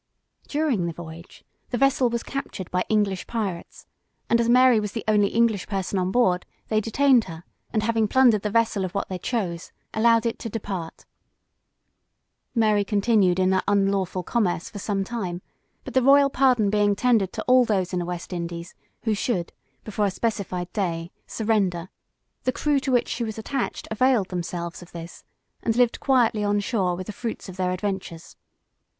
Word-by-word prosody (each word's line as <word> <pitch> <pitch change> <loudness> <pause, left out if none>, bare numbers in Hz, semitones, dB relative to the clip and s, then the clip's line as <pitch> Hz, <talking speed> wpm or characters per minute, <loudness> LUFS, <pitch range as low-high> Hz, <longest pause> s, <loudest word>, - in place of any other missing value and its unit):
During 285 - 0
the 170 - -3
voyage, 165 +1 -11 0.3
the 245 - -1
vessel 270 -1 +3
was 235 0 -2
captured 275 -9 -6
by 180 0 +1
English 205 -4 0
pirates, 200 -7 -4 0.5
and 235 - +5
as 235 - 0
Mary 250 -1 +6
was 210 -1 -4
the 225 - -4
only 210 -2 +4
English 225 -3 +1
person 195 -1 -2
on 180 0 0
board, 185 -5 +2 0.3
they 215 -1 +2
detained 250 +2 +3
her, 165 -1 -9 0.3
and 215 -2 0
having 225 -1 +1
plundered 240 -3 +4
the 210 - -2
vessel 225 -2 +1
of 185 0 -5
what 200 - -2
they 185 -1 -4
chose, 180 -9 -3 0.2
allowed 230 +1 +3
it 230 - -1
to 230 - -5
depart. 195 -6 -6 1.5
Mary 215 -3 +3
continued 200 -3 +2
in 185 0 +3
that 190 0 +2
unlawful 195 -2 +1
commerce 180 -5 -1
for 205 - -7
some 195 0 -1
time, 190 -5 -4 0.4
but - - -8
the 260 - +4
royal 275 +2 +5
pardon 250 -7 +3
being 205 -1 +3
tendered 220 -5 +2
to - - -4
all 255 0 +5
those 195 -5 0
in 180 - 0
the - - -1
West 175 +1 -5
Indies, 170 0 -5 0.3
who 220 - +1
should, 200 -4 -2 0.3
before 210 -1 -1
a - - +1
specified 190 -4 -3
day, 170 -4 -2 0.2
surrender, 195 -6 0 0.5
the 255 - +1
crew 290 +1 +1
to 265 - -2
which 245 -2 +2
she 235 - -3
was 220 -1 -4
attached, 245 +3 -3
availed 230 -3 +2
themselves 170 -1 -4
of 175 - -14
this, 170 0 -9 0.4
and 225 - 0
lived 245 -1 +2
quietly 240 -6 +2
on 205 0 +1
shore 195 -4 0
with 185 +1 -6
the 210 - -6
fruits 230 0 -5
of 185 - -8
their 185 -1 0
adventures. 185 -3 -4
205 Hz, 180 wpm, -24 LUFS, 185-235 Hz, 1.5 s, Mary